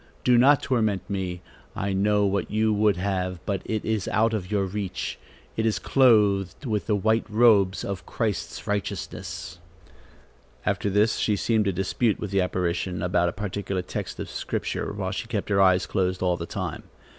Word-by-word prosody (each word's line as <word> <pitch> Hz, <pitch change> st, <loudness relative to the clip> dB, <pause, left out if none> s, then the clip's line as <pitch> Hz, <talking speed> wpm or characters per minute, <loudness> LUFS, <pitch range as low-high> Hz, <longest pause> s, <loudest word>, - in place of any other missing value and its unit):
Do 125 Hz, -, +4 dB
not 135 Hz, +4 st, +5 dB
torment 110 Hz, -6 st, 0 dB
me. 90 Hz, -3 st, -3 dB, 0.3 s
I 100 Hz, 0 st, -2 dB
know 105 Hz, +1 st, +2 dB
what 100 Hz, -1 st, 0 dB
you 110 Hz, 0 st, +2 dB
would 105 Hz, -2 st, +3 dB
have; 90 Hz, -1 st, -1 dB
but 100 Hz, -2 st, -1 dB
it 110 Hz, -1 st, -2 dB
is 110 Hz, -4 st, -1 dB
out 115 Hz, +1 st, +2 dB
of 95 Hz, -4 st, -3 dB
your 100 Hz, -2 st, +1 dB
reach; 95 Hz, 0 st, -4 dB, 0.4 s
it 110 Hz, -, 0 dB
is 110 Hz, -1 st, +1 dB
clothed 105 Hz, -, +3 dB
with 105 Hz, -4 st, -1 dB
the 105 Hz, -, +2 dB
white 110 Hz, +3 st, +2 dB
robes 105 Hz, -4 st, +4 dB
of 95 Hz, -2 st, -5 dB
Christ's 110 Hz, -6 st, -3 dB
righteousness." 95 Hz, -3 st, -4 dB, 1.1 s
After 100 Hz, 0 st, 0 dB
this, 105 Hz, +3 st, +2 dB
she 105 Hz, -, +1 dB
seemed 110 Hz, +1 st, +1 dB
to 100 Hz, -, +2 dB
dispute 95 Hz, +4 st, 0 dB
with 105 Hz, -, -5 dB
the 100 Hz, -1 st, +2 dB
apparition 90 Hz, 0 st, -1 dB
about 90 Hz, -1 st, +2 dB
a -, -, -3 dB
particular 95 Hz, -1 st, -3 dB
text -, -, -5 dB
of -, -, -4 dB
Scripture, -, -, -3 dB
while 100 Hz, -2 st, -3 dB
she 110 Hz, +3 st, -4 dB
kept 110 Hz, -4 st, -3 dB
her 100 Hz, -1 st, +3 dB
eyes 95 Hz, -1 st, +4 dB
closed 95 Hz, -1 st, -1 dB
all 90 Hz, -1 st, +2 dB
the 85 Hz, -1 st, -6 dB
time. -, -, -4 dB
100 Hz, 180 wpm, -25 LUFS, 95-110 Hz, 1.1 s, not